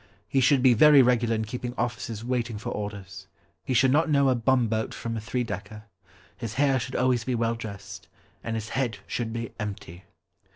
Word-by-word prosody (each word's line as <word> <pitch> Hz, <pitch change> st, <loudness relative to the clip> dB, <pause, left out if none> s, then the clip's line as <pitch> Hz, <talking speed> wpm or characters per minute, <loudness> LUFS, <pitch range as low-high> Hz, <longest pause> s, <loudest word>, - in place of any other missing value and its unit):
He 135 Hz, +5 st, +1 dB
should 130 Hz, 0 st, +4 dB
be 130 Hz, -2 st, +7 dB
very 145 Hz, +3 st, +7 dB
regular 120 Hz, -2 st, +2 dB
in 110 Hz, 0 st, -2 dB
keeping 120 Hz, +2 st, -5 dB
officers 120 Hz, -2 st, -3 dB
waiting 120 Hz, -3 st, -2 dB
for 105 Hz, -, -5 dB
orders. 100 Hz, -2 st, -6 dB, 0.4 s
He 130 Hz, -, -2 dB
should 130 Hz, +2 st, +4 dB
not 155 Hz, +4 st, +3 dB
know 140 Hz, -2 st, +4 dB
a 130 Hz, -, +3 dB
bumboat 115 Hz, -2 st, +1 dB
from 115 Hz, 0 st, -4 dB
a 110 Hz, -, -4 dB
three 110 Hz, +4 st, -2 dB
decker. 105 Hz, -1 st, -7 dB, 0.5 s
His 115 Hz, -3 st, -6 dB
hair 135 Hz, -1 st, +3 dB
should 130 Hz, +2 st, -6 dB
always 125 Hz, -1 st, +2 dB
be 125 Hz, 0 st, -1 dB
well 115 Hz, 0 st, 0 dB
dressed, 100 Hz, -4 st, -8 dB, 0.4 s
And 115 Hz, -, -3 dB
his 110 Hz, -1 st, -4 dB
head 125 Hz, -6 st, -1 dB
should 115 Hz, -2 st, -3 dB
be 115 Hz, 0 st, -4 dB
empty! 100 Hz, -4 st, -7 dB
115 Hz, 195 wpm, -26 LUFS, 110-130 Hz, 0.5 s, be